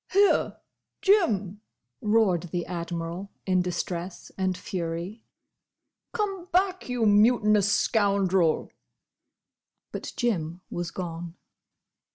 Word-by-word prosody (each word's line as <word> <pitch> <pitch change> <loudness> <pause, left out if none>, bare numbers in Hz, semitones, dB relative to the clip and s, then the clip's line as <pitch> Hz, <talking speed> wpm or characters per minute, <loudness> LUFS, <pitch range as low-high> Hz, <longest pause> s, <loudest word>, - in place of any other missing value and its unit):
"Here! 400 +1 +3 0.5
Jim!" 210 - +2 0.4
roared 205 -6 +2
the 175 +1 -2
Admiral, 170 +2 -4 0.2
in 185 -1 +2
distress 180 0 -4
and 185 -1 -1
fury. 175 +4 -5 0.8
"Come 395 -5 -2
back! 370 -3 +1
you 245 -2 +1
mutinous 210 -1 +4
scoundrel!" 195 -6 +2 1.2
But - - -5
Jim 180 -8 -1
was 175 -1 -3
gone. 170 -1 -6
190 Hz, 90 wpm, -27 LUFS, 175-225 Hz, 1.2 s, mutinous